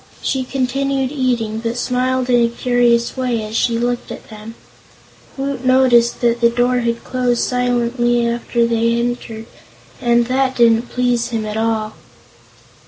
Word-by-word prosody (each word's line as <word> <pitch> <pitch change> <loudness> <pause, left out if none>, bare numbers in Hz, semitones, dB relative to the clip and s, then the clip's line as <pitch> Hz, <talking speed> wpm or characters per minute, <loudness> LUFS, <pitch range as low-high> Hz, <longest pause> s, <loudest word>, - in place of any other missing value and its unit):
She 265 -1 -1
continued 270 +1 -1
eating, 240 -6 -1
but 230 +1 -3
smiled 255 +1 0
in 245 -1 +3
a 235 - +2
curious 235 -1 +1
way 250 -4 -1
as 215 +1 -7
she 230 0 +1
looked 240 +1 -2
at - - -10
them. 215 +1 -10 0.8
Woot 270 -1 -3
noticed 255 -2 +3
that 235 0 +1
the 235 - +5
door 245 +1 +1
had 235 -1 -2
closed 250 -2 0
silently 240 -1 0
after 235 0 0
they 230 0 +1
had 235 - 0
entered, 230 -2 -5 0.6
and 235 0 +3
that 260 +1 0
didn't 235 0 +3
please 245 -1 0
him 225 -2 -3
at 210 0 -5
all. 220 -1 -1
240 Hz, 155 wpm, -18 LUFS, 235-250 Hz, 0.8 s, the